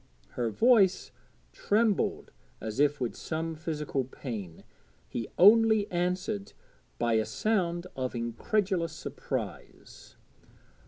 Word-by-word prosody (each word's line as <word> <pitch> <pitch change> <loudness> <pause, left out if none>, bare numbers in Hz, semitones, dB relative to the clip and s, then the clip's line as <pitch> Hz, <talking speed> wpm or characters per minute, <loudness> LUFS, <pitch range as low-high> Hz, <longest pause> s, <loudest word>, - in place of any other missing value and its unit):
Her 120 -2 -2
voice 200 - +3 0.4
trembled 215 -1 +1 0.3
as 110 +3 -5
if 145 0 +3
with 125 -3 -2
some 165 +1 -3
physical 150 -4 -3
pain; 110 - -7 0.4
he 115 - -4
only 220 +2 +6
answered 185 +4 -2 0.4
by 120 -1 +1
a 110 0 +3
sound 175 - -1
of 130 -1 -3
incredulous 165 - -1
surprise. 160 - -7
165 Hz, 100 wpm, -29 LUFS, 125-200 Hz, 0.4 s, only